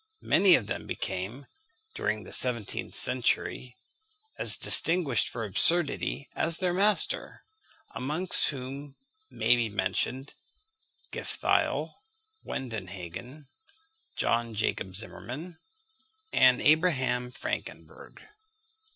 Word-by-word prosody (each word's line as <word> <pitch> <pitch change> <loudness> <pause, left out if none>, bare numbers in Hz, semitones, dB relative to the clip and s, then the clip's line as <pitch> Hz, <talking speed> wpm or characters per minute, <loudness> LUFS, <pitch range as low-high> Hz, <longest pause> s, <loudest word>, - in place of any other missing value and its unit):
Many 190 -3 +5
of 115 - -1
them - - -6
became, 110 +10 -5 0.5
during 105 0 -3
the - - -9
seventeenth 120 -5 0
century, 125 0 0 0.6
as - - +2
distinguished 155 - +3
for 115 -2 -5
absurdity 140 - +1
as 165 0 +2
their 180 -2 0
master; 205 +3 +3 0.5
amongst 155 +8 +3
whom 135 +1 -7 0.3
may 125 - +2
be 120 -2 -1
mentioned 130 +6 -3 0.8
Gifftheil, - - -1 0.5
Wendenhagen, 115 - -7 0.7
John 115 -1 -1
Jacob 95 -3 -3
Zimmermann, 135 - -8 0.7
and 130 -1 +4
Abraham 135 -6 +2
Frankenberg. 125 - -7
130 Hz, 90 wpm, -28 LUFS, 115-155 Hz, 0.8 s, Many